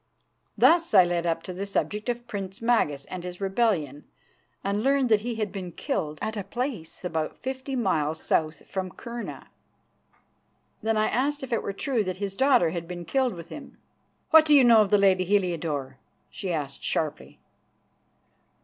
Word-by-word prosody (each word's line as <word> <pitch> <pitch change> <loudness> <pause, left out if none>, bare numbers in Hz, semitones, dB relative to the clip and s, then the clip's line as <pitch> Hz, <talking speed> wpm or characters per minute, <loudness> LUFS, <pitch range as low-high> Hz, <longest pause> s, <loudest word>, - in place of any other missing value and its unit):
Thus 335 -8 +4
I 185 - +9
led 175 -1 -1
up 165 0 -1
to 185 - -6
the 195 +3 -4
subject 210 +3 -2
of 240 0 -3
Prince 195 -4 -6
Magas 225 - +1
and 185 -1 -7
his 180 0 -7
rebellion, 195 - 0 0.6
and 200 +1 0
learned 270 0 +2
that 215 -2 +4
he 235 +1 -3
had 215 -3 -2
been 185 -3 -6
killed 155 -1 -3
at 220 - -2
a 205 - -3
place 235 - -5
about 160 -3 -2
fifty 265 +1 -4
miles 160 - 0
south 155 -1 -1
from 190 -1 -3
Kurna. 235 +6 -8 1.3
Then 225 0 0
I 215 - +3
asked 280 +4 0
if 260 -2 -4
it 230 - +1
were - - -3
true 230 +3 -1
that 185 -2 -4
his 200 -1 -3
daughter 255 - +3
had 170 -1 -5
been 175 -1 -6
killed 260 -3 0
with 170 0 -10
him. 290 - -10 0.5
"What 320 -1 +9
do 300 -1 +5
you 275 - +7
know 230 -2 +7
of 205 - +1
the 205 - +5
lady 190 -2 +4
Heliodore?" 165 -9 -1 0.3
she 190 -3 -4
asked 145 -4 -4
sharply. 155 -2 -2
195 Hz, 175 wpm, -26 LUFS, 170-240 Hz, 1.3 s, I